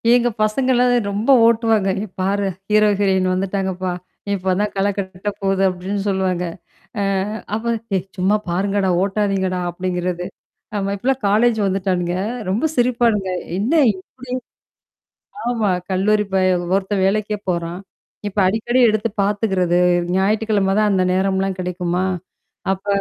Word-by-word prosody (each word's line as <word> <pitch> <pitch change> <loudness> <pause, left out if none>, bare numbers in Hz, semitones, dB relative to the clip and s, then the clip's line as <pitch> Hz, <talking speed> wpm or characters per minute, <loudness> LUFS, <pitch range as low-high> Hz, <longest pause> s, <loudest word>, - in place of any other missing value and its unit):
எங்க 240 0 +3
பசங்கலா 250 +3 +2 0.3
ரொம்ப 210 +6 -2 0.2
ஓட்டுவாங்க. 225 -3 +3
"ஏ - - -3 0.2
பாரு 200 +1 0 0.2
ஹீரோஹிரன் 200 -3 +3
வந்துட்டாங்கப்பா. 190 -1 -2 0.3
நீ - - -6
இப்ப 185 0 0
தான் 210 - -1
கல 195 +1 +1
கட்ட 190 +1 -4
போது" 195 0 +1
அப்டின்னு 190 +2 -3
சொல்லுவாங்க. 185 -2 0 0.6
அ - - 0 0.5
அப்ப 225 +2 -4 0.3
ஏய்! 185 - 0
சும்மா 190 +3 +2
பாருங்கடா 195 +2 0
ஓட்டாதீங்கடா! 195 -2 0
அப்டிங்கிறது. 180 0 -3 0.5
ஆமா. 200 0 -1
இப்பலாம் 265 +4 0
காலேஜ் 220 +2 +3
வந்துட்டானுங்க. 185 -2 -1 0.3
ரொம்ப 220 +11 0
சிரிப்பானுங்க. 235 -5 +2 0.3
என்ன 230 +11 0 0.2
இப்டி? 250 +7 -10 1.2
ஆமா. 225 -4 0 0.2
கல்லூரி 210 +3 +2
பய 185 -1 +3 0.3
ஒருத்தன் 195 0 0
வேலைக்கே 210 +1 0
போறான். 170 +1 -3 0.5
இப்ப 205 - -8
அடிக்கடி 225 +5 +1
எடுத்து 215 +1 +1
பார்த்துக்கிறது. 195 -4 +1 0.4
ஞாயிற்றுக்கிழமை 205 0 +1
தான் 210 -1 +3
அந்த 185 -1 +2
நேரம்லாம் 190 0 0
கிடைக்குமா? 180 0 -1 0.7
அப்ப 195 +1 -6
195 Hz, 125 wpm, -20 LUFS, 185-215 Hz, 1.2 s, எங்க